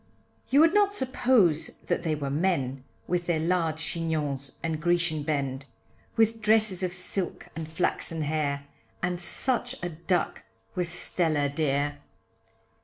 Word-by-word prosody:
You 280 +3 +5
would 330 +2 +5
not 410 -1 +3
suppose 245 - +2
that - - 0
they 160 -2 0
were 140 -2 -3
men, 140 -5 0 0.2
With 175 -1 -1
their 170 -3 +1
large 165 -1 0
Chignons 155 -4 -1
and 160 -1 -2
Grecian 175 -2 +1
bend, 140 -2 -2 0.5
With 225 0 +2
dresses 215 -3 +3
of 185 -1 -1
silk, 180 0 -4
and 160 -1 -5
flaxen 160 0 0
hair, 145 -2 -1 0.4
And 175 0 -1
such 245 +7 +1
a 175 - -1
duck 170 +1 -1 0.3
was 180 -2 +2
Stella 160 -4 +2
dear. 145 0 -1
165 Hz, 135 wpm, -27 LUFS, 150-185 Hz, 0.5 s, You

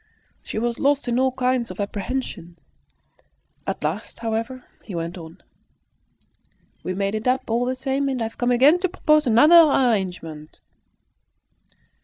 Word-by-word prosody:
She - - -7
was 235 +1 -2
lost 285 -1 +1
in 240 +1 +1
all 260 0 +2
kinds 255 -2 -1
of - - -9
apprehensions. 200 -4 -5 1.0
At - - -3
last, - - -4
however, 230 +3 -4 0.2
he 195 - -8
went 170 +1 -4
on 165 0 -12 1.4
"We 185 - -4
made 195 +1 -1
it 220 +2 -3
up, 255 +1 +1
all 235 +2 +1
the 255 +1 -1
same, 270 +1 -1
and 260 -2 -2
I've 225 -1 -5
come 245 - +1
again 270 +8 +5
to 370 0 -1
propose 305 -4 +2
another 295 +9 +7
arrangement." 190 - 0
240 Hz, 145 wpm, -22 LUFS, 200-265 Hz, 1.4 s, another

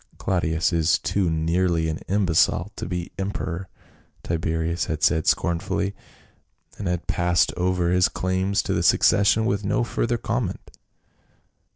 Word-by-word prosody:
" - - -26
Claudius 85 -2 0
is 80 -1 +3
too 95 -4 0
nearly 80 +1 +1
an 80 0 -3
imbecile 90 0 +2
to - - -5
be 90 -1 -4
emperor," 95 -2 -4 0.5
Tiberius 80 0 -1
had 80 -3 -4
said 80 0 +2
scornfully, 95 +3 0 0.9
and 100 - -3
had 90 -1 -2
passed 85 0 +1
over 90 -1 0
his 90 +1 +3
claims 95 +2 -1
to - - -2
the - - 0
succession 105 +2 +4
with 105 -3 0
no 105 +4 +1
further 120 0 -1
comment. 115 -4 -4
90 Hz, 140 wpm, -24 LUFS, 85-95 Hz, 0.9 s, succession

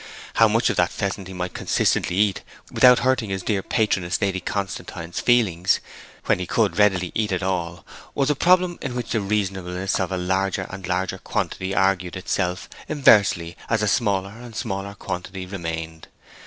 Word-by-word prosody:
How 115 - +7
much 115 +3 +2
of - - -5
that 90 0 +3
pheasant 100 -1 -3
he 95 - -8
might 90 0 -4
consistently 90 - +1
eat 100 -1 +2 0.3
without 125 -1 +6
hurting 130 -4 +1
his 95 -1 -3
dear 100 -3 0
patroness 95 -4 0
Lady 95 -1 0
Constantine's 85 -3 -4
feelings, 95 -8 +3 0.5
when - - +2
he 90 - -4
could 105 -1 +1
readily 95 -4 +3
eat 105 -2 -1
it 95 0 -1
all, 90 -2 -2 0.3
was 140 +1 +2
a - - 0
problem 180 +2 +3
in 125 -3 -4
which 125 - -4
the 110 - +1
reasonableness 95 -2 -1
of 95 0 -1
a 95 - -1
larger 95 +1 0
and 95 -1 -7
larger 90 0 -1
quantity 95 +1 -3
argued 95 -2 +1
itself 90 -1 -2 0.2
inversely 100 - +4
as 110 -1 +1
a - - +2
smaller 100 -4 +1
and 120 -2 -11
smaller 100 -3 -4
quantity 95 0 -5
remained. 80 -3 -6
95 Hz, 170 wpm, -23 LUFS, 90-105 Hz, 0.5 s, How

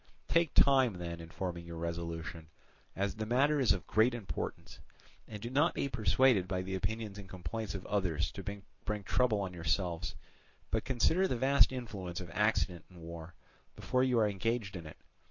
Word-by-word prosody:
"Take 165 -2 +2
time 135 -5 +6
then 85 -1 -5
in 80 0 -9
forming 90 -1 -4
your 85 -1 -8
resolution, 85 -1 -4 0.5
as 100 0 0
the 110 - -2
matter 140 +5 +3
is 130 - +4
of 90 - 0
great 115 +3 +3
importance; 110 -5 -5 0.5
and 105 - -7
do 120 +3 -5
not 145 +6 +3
be - - 0
persuaded 115 -3 +3
by 90 -1 -1
the 95 +1 -5
opinions 105 +1 -3
and 95 -2 -10
complaints 95 +4 -4
of 95 - -6
others 90 -5 0
to 100 - -7 0.4
bring 105 -1 -2
trouble 110 +1 +2
on 95 -2 -3
yourselves, 85 0 -1 0.6
but - - 0
consider 160 +9 +3
the 125 - -1
vast 135 +3 +5
influence 100 -9 -5
of 90 -2 -8
accident 90 -3 +1
in 90 -2 -14
war, 85 0 -8 0.4
before 130 0 +1
you 130 -2 +3
are 110 -2 +4
engaged 105 0 -1
in 85 -3 -6
it. 75 - -11
100 Hz, 180 wpm, -33 LUFS, 85-120 Hz, 0.6 s, time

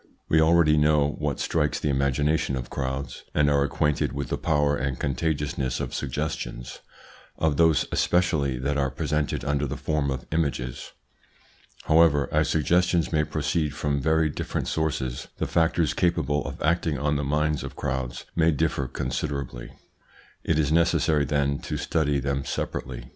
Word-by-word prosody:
We 80 - +4
already 80 -1 +4
know 75 -1 +3
what 75 -3 -2
strikes 75 -3 0
the 75 - 0
imagination 70 +2 +1
of 60 -2 -6
crowds, 65 -1 -4
and 75 -1 +3
are 70 -1 +3
acquainted 75 +1 0
with 70 -2 -4
the - - -1
power 75 -2 +2
and 65 -1 -2
contagiousness 70 -2 -1
of - - -4
suggestions, 65 -3 -4 0.6
of 80 -3 +1
those 80 -3 +4
especially 75 -7 +1
that 70 +3 -1
are 70 -1 +1
presented 75 +1 -2
under 75 0 0
the 70 +3 -4
form 75 -2 -1
of 65 -2 -4
images. 70 -6 -2 0.9
However, 80 -4 +4
as 75 -1 +2
suggestions 85 +1 +2
may 75 -1 +3
proceed 75 0 -1
from 70 -2 -1
very 80 +2 +2
different 75 - -3
sources, 70 -6 -2
the - - -1
factors 80 -1 +1
capable 75 -5 +1
of - - -7
acting 80 -2 +1
on 75 +2 0
the 75 - -1
minds 75 +1 0
of - - -7
crowds 65 -3 -3
may 80 -1 +4
differ 75 -3 0
considerably. 70 -2 -4 0.7
It 80 - +1
is 75 -2 +1
necessary, 80 -2 +3
then, 70 0 0
to - - -4
study 75 -3 0
them 70 0 -1
separately. - - -4
75 Hz, 155 wpm, -25 LUFS, 70-80 Hz, 0.9 s, We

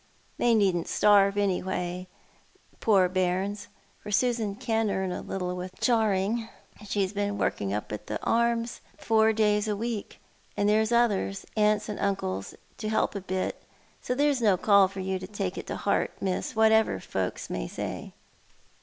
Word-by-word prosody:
They 240 -1 +4
needn't 190 -5 +2
starve, 200 -1 +4
anyhow, 185 -2 -1 0.7
poor 195 -4 +4
bairns, 185 +3 -1 0.3
for - - -8
Susan 225 -1 +1
can 225 0 0
earn 190 -2 -1
a - - -4
little 180 -1 -3
with 180 +1 -7
charing. 220 -1 +1 0.4
She's 195 -1 -1
been 205 0 -1
working 100 -1 -1
up 105 +1 -3
at 105 0 -6
the - - -3
Arms 235 0 +1 0.2
four 220 +2 +3
days 210 -1 +2
a 210 - 0
week, 225 0 -4 0.4
and 205 - +2
there's 220 +2 +3
others 215 -4 +1
— - - -31
uncles 210 -1 +2
and 210 - -5
aunts 100 - -2 0.2
— - - -34
to 215 - -3
help 220 - +1
a 200 - -4
bit, 185 0 -3 0.4
so 250 - -2
there's 285 -2 +2
no 205 -5 +4
call 200 0 +5
for 190 0 -7
you 190 0 -2
to 185 - -7
take 195 -2 -3
it - - -7
to - - -3
heart, 200 - 0
Miss, 190 +2 -2
whatever 220 0 +4
folks - - -3
may - - -3
say." - - -6
205 Hz, 170 wpm, -27 LUFS, 190-220 Hz, 0.7 s, call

